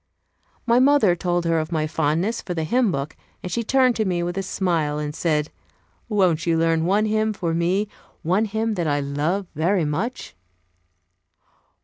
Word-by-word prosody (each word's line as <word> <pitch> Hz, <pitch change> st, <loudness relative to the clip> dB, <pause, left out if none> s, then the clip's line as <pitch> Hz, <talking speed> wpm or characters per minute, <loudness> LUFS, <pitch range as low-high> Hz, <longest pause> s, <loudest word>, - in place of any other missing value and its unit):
My 240 Hz, 0 st, +4 dB
mother 260 Hz, -9 st, +4 dB
told 175 Hz, -1 st, -1 dB
her 165 Hz, -1 st, +2 dB
of 155 Hz, +2 st, -4 dB
my 155 Hz, -2 st, 0 dB
fondness 160 Hz, +8 st, 0 dB
for 180 Hz, -, -5 dB
the 160 Hz, -, -1 dB
hymn 235 Hz, +5 st, +2 dB
book, 140 Hz, 0 st, -4 dB, 0.3 s
and 180 Hz, -, -5 dB
she 235 Hz, +6 st, -1 dB
turned 255 Hz, +1 st, +3 dB
to 220 Hz, -, +1 dB
me 180 Hz, -4 st, -1 dB
with 175 Hz, 0 st, -3 dB
a 195 Hz, -, -1 dB
smile 170 Hz, -6 st, -1 dB
and 150 Hz, 0 st, -3 dB
said, 150 Hz, -2 st, -1 dB, 0.6 s
"Won't 180 Hz, -7 st, +1 dB
you 165 Hz, -1 st, +2 dB
learn 165 Hz, 0 st, +2 dB
one 205 Hz, +4 st, +2 dB
hymn 215 Hz, 0 st, +1 dB
for 175 Hz, -5 st, -2 dB
me 180 Hz, +5 st, +1 dB, 0.4 s
one 185 Hz, +7 st, +2 dB
hymn 220 Hz, +1 st, -1 dB
that 175 Hz, -5 st, -2 dB
I 145 Hz, -1 st, +1 dB
love 150 Hz, +8 st, -1 dB
very 170 Hz, +3 st, +1 dB
much?" 225 Hz, -, -3 dB
175 Hz, 175 wpm, -23 LUFS, 160-210 Hz, 0.6 s, My